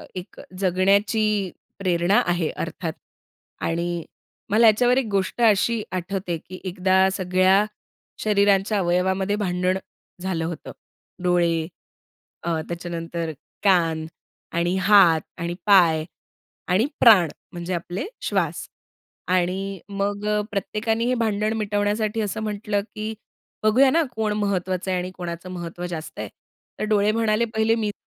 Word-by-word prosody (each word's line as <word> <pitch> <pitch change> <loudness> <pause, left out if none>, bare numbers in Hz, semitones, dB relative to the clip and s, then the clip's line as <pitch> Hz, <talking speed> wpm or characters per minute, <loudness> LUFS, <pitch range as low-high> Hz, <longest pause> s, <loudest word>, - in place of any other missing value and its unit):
एक 180 0 -8 0.2
जगण्याची 200 +2 +2 0.3
प्रेरणा 180 0 +2
आहे 175 -2 +1
अर्थात 165 -1 -4 0.7
आणि 170 0 -1 0.5
मला 225 +2 +5
याच्यावर 245 +4 +4
एक 265 - +2
गोष्ट 195 +4 -1
अशी 225 +1 +3
आठवते, 185 -1 -3
की 185 +3 -11
एकदा 190 +1 +3
सगळ्या 185 +2 +3 0.6
शरीरांच्या 200 0 +3
अवयवामध्ये 190 +2 +1
भांडण 185 -2 0 0.4
झालं 175 -3 -2
होतं. 170 -1 -6 0.5
डोळे 170 -2 +2 0.8
अ, 165 -2 0
त्याच्यानंतर 170 -1 -4 0.3
कान 165 -5 +3 0.5
आणि 175 +2 +1
हात 190 -5 +6 0.2
आणि 170 +1 -2
पाय 170 -6 +5 0.6
आणि 190 +6 +3
प्राण 200 -9 +7 0.2
म्हणजे 175 +1 -4
आपले 175 - -3 0.2
श्वास. - - -1 0.6
आणि 185 +2 0
मग 200 +1 -2 0.3
प्रत्येकाने 220 +3 -1
हे 250 - +2
भांडण 215 -2 0
मिटवण्यासाठी 210 +1 0
असं 215 +1 -3
म्हटलं, 205 -1 -1
की 215 +1 -3 0.5
बघूया 250 +6 +5
ना 330 +1 +3
कोण 215 -1 0
महत्त्वाचं 190 -2 -1
आहे 185 - +1
आणि 180 +1 -4
कोणाचं 175 0 -6
महत्त्व 175 0 -6
जास्त 160 -3 -7
आहे. - - -4 0.5
तर - - -1
डोळे 210 0 +3
म्हणाले 225 0 +1
पहिले 220 +1 +3
मीच 215 -2 -1
190 Hz, 120 wpm, -23 LUFS, 175-210 Hz, 0.8 s, प्राण